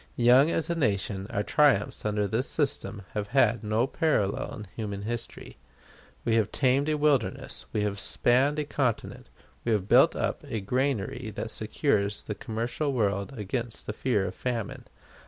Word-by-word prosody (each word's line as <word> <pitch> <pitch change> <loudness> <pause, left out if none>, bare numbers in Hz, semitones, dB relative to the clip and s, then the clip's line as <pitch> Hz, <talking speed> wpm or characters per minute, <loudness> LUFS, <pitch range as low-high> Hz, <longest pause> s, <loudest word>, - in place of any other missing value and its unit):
Young 125 +5 +6
as 165 - 0
a 170 - 0
nation, 100 - -1
our 100 - -1
triumphs 130 -6 +2
under 105 -1 0
this 115 +7 0
system 105 -9 -1
have 105 -1 -2
had 120 -3 +4
no 110 +3 +1
parallel 135 -9 0
in 105 - -8
human 100 -3 -4
history. 120 +2 -6 0.7
We 115 - +2
have 110 -3 +1
tamed 135 +2 +2
a 155 - +1
wilderness; 140 -10 0
we 105 - 0
have 100 -1 -2
spanned 130 +8 +2
a 150 - 0
continent. 130 -5 -2 0.3
We 115 - +1
have 100 -3 0
built - - +6
up - - -2
a 110 - -2
granary 125 +1 -1
that - - -4
secures 100 0 0
the 105 - -4
commercial 115 +8 -2
world 100 +1 -1
against 115 +3 -4
the 105 - -4
fear 110 -4 0
of 95 - -4
famine. 120 -5 -4
115 Hz, 165 wpm, -28 LUFS, 105-130 Hz, 0.7 s, Young